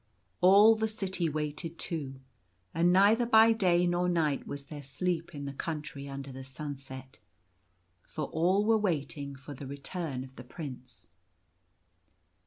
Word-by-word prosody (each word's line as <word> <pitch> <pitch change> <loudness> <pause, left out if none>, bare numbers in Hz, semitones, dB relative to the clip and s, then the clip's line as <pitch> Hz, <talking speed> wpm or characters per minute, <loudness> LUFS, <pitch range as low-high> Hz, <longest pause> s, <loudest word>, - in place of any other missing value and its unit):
All 200 +4 +8
the 220 0 0
city 190 -6 -1
waited 155 +2 -3
too; 135 -6 -4 0.5
and 170 +2 +3
neither 210 +6 +5
by 225 0 +7
day 180 -5 +3
nor 175 0 +1
night 155 -5 0
was 140 0 -6
there 145 0 -8
sleep 165 +5 -3
in 140 -1 -5
the 140 - -5
Country 150 -2 -5
Under 135 0 -7
the 130 +1 -8
Sunset, 130 -1 -8 0.8
for 155 - -5
all 185 +6 +2
were 225 0 +4
waiting 145 -7 -2
for 135 +2 -10
the 140 0 -8
return 140 0 -5
of 130 0 -13
the 125 - -8
Prince. 125 - -9
155 Hz, 145 wpm, -30 LUFS, 140-180 Hz, 0.8 s, All